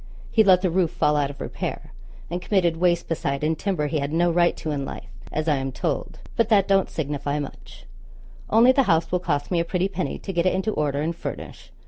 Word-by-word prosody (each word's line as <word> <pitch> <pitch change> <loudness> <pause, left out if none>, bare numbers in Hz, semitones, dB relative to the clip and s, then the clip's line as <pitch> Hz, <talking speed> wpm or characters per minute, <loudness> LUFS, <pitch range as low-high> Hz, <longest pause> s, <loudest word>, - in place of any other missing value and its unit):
He 220 - +5
let 185 -2 +5
the 185 - +2
roof 175 -2 0
all 150 - +4
out 145 -1 +1
of 140 - -10
repair, - - -5 0.4
and 175 +2 -4
committed 175 -4 +1
waste 175 0 +2
beside 145 -4 -2
in 160 +1 +1
timber 175 -3 -1
he 150 +1 -1
had 140 +1 -2
no 170 +2 +2
right 175 0 +2
to 155 - -4
in 140 -2 -2
life, - - -8 0.2
as 155 +1 -2
I 150 -3 +3
am 135 0 -3
told; - - -3 0.2
but 230 -2 +2
that 200 -4 +4
don't 195 -1 +3
signify 145 -1 -2
much, 145 -2 -8 0.6
only 230 +4 +6
the 275 - +4
house 165 -1 +2
will 180 - +2
cost 145 -4 -2
me 175 - +2
a - - +2
pretty 180 +2 0
penny 190 -2 -3
to 195 - -6
get 170 +1 +2
it 185 - +2
into 190 +3 0
order 145 -5 -1
and 165 +2 -2
furnish. - - -7
170 Hz, 230 wpm, -24 LUFS, 150-185 Hz, 0.6 s, only